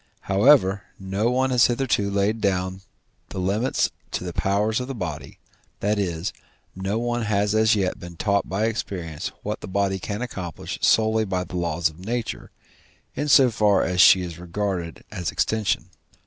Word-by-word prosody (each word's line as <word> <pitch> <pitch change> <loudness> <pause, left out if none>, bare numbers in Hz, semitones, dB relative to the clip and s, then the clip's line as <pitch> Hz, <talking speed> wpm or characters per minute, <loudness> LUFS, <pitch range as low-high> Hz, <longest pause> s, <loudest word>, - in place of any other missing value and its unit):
However, 100 -1 +4 0.2
no 100 +4 -1
one 130 +1 +1
has 125 -2 +5
hitherto 120 -5 0
laid 100 +3 0
down 95 -1 -1 0.5
the - - -8
limits 100 +7 0 0.2
to - - -2
the 90 -1 -5
powers 105 +5 +1
of 125 - -4
the 135 - -5
body, 75 - -6 0.4
that 105 +1 0
is, 85 -2 -2 0.4
no 95 +3 -2
one 120 +1 -1
has 105 -1 +1
as 110 0 +4
yet 95 -3 -1
been 85 0 -9
taught 100 +3 0
by 100 +4 0
experience 90 -9 -3 0.2
what - - -4
the - - -7
body 95 0 0
can 105 +5 -4
accomplish 90 -8 -6
solely 110 0 +3
by 95 -3 -1
the 90 +1 -9
laws 85 -1 0
of 80 +1 -10
nature, 115 +4 -4 0.6
in 145 +2 -2
so 135 -3 +6
far 105 -3 +3
as 90 -1 +2
she 95 0 +7
is 85 -2 -7
regarded 90 -1 -3
as 90 -5 -3
extension. 95 -5 -1
100 Hz, 170 wpm, -24 LUFS, 90-110 Hz, 0.6 s, she